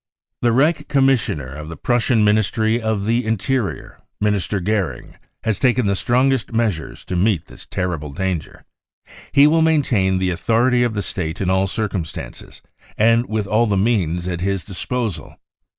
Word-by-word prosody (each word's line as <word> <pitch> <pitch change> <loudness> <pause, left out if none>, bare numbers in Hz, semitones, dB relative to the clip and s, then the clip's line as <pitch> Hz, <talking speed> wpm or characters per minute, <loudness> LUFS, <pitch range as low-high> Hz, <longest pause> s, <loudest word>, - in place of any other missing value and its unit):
" - - -64
The 120 - +3
Reich 150 +4 +2
Commissioner 135 - +2
of 75 +2 -8
the 80 - -8
Prussian 120 -2 +2
Ministry 110 +2 +2
of 110 -3 -1
the 115 +3 +1
Interior, 110 +1 -2 0.2
Minister 105 -1 0
Goering, 95 - -2 0.3
has 110 -3 -1
taken 125 -2 +2
the 100 - +2
strongest 125 +4 +1
measures 110 -8 -2
to 90 - -4
meet 90 -2 +1
this - - -13
terrible 85 -5 -3
danger. 90 +1 -4 0.7
He 140 +1 +6
will 160 +2 +4
maintain 125 -12 +2
the 95 0 0
authority 115 +8 +2
of 120 -3 0
the 105 - -1
State 80 -1 -4
in 95 -1 0
all 95 +1 +2
circumstances 95 -6 -5 0.3
and 115 +2 +3
with 110 -1 -1
all 110 +4 +2
the 100 -2 +1
means 90 -5 0
at 90 -1 -3
his 95 -1 -1
disposal. 105 -3 -4
105 Hz, 160 wpm, -20 LUFS, 95-120 Hz, 0.7 s, He